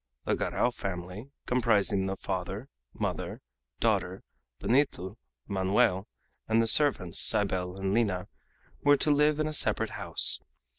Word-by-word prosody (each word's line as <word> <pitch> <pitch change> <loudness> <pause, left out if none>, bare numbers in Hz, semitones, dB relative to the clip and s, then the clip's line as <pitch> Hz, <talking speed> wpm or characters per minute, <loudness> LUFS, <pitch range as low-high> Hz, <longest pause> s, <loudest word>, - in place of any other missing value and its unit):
The - - +1
Garral 125 - 0
family, 95 +3 -6 0.2
comprising 105 -5 +1
the 95 0 -3
father, 95 +7 -5 0.2
mother, - - -4 0.4
daughter, - - 0 0.3
Benito, 120 -8 0 0.3
Manoel, 95 0 +1 0.4
and 110 +1 +2
the 115 - +3
servants, 115 - +4
Cybele 95 -2 +1
and 95 0 -2
Lina, 100 -6 0 0.6
were 145 0 +5
to 150 - +1
live 150 +1 +3
in 155 - +1
a 155 - -3
separate - - 0
house. - - +1
100 Hz, 130 wpm, -29 LUFS, 95-125 Hz, 0.6 s, were